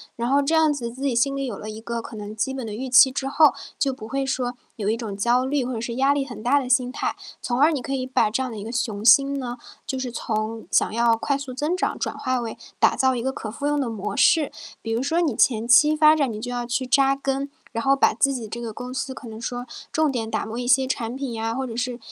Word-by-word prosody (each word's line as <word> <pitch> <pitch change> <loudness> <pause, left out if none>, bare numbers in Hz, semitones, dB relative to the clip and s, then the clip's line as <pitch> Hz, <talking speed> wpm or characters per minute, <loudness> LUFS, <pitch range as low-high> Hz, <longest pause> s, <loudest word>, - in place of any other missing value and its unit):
然 235 +1 -2
后 280 +1 +3
这 315 +4 0
样 320 -1 +4
子 235 -5 -4
自 260 +3 -12
己 270 -4 0
心 275 +3 +2
里 275 -1 -2
有 210 - -5
了 215 +1 -7
一 220 +1 -9
个 235 0 -4
可 225 - -9
能 210 0 -7
基 265 +5 -1
本 260 -3 -5
的 210 - -5
预 260 +4 -4
期 255 +2 +7
之 270 +1 -3
后， 295 +1 +5 0.2
就 275 - +2
不 220 -4 -9
会 275 +3 -1
说 255 -2 -2 0.2
有 205 -2 -4
一 220 - +2
种 215 -4 -6
焦 245 +5 +2
虑 275 -2 0
或 255 - -3
者 225 - -4
是 235 0 -4
压 270 +2 +3
力 285 -1 0
很 235 -5 -9
大 280 +4 +4
的 255 -2 -5
心 250 -1 +2
态， - - -2 0.3
从 245 +1 -1
而 305 +3 +5
你 280 -5 -2
可 275 - -4
以 255 -1 -2
把 255 -4 +2
这 260 +5 -1
样 255 - -4
的 220 - -7
一 - - -6
个 225 - -6
雄 220 -4 -2
心 275 +5 +5
呢， 245 -1 -5 0.3
就 265 - -2
是 255 -1 -3
从 220 -1 -3
想 - - +2
要 230 -1 +3
快 280 +4 0
速 275 -2 -5
增 300 +7 -1
长， 400 +3 -1
转 - - -3
化 255 0 -1
为 230 -2 -5 0.2
打 - - +4
造 260 -1 +2
一 235 - -2
个 265 +2 -1
可 220 -4 -6
复 280 +6 -6
用 295 0 +1
的 265 - -1
模 210 -2 -4
式。 310 -4 +4 0.3
比 225 - -5
如 230 +2 0
说 325 +5 +1
你 290 -10 0
前 230 -2 +2
期 300 +5 +6
发 305 0 +6
展， 275 -6 +1
你 210 - -6
就 245 +1 -4
要 245 -1 -3
去 245 +2 -1
扎 275 +1 +3
根， 275 0 -2 0.2
然 230 - -2
后 275 0 +4
把 - - +3
自 275 0 +2
己 240 -4 -4
这 230 +3 -6
个 230 -2 -5
公 250 +3 -7
司 265 0 -3
可 260 - -11
能 220 - -8
说 245 +1 -4 0.3
重 315 -2 +2
点 225 -4 -3
打 220 - -2
磨 225 +3 -5
一 245 - -3
些 260 +1 +4
产 240 -2 -3
品 270 -2 -4
呀， 225 0 -3
或 265 0 -2
者 230 -1 -6
是 245 -1 -2
250 Hz, 310 characters per minute, -23 LUFS, 230-275 Hz, 0.3 s, 期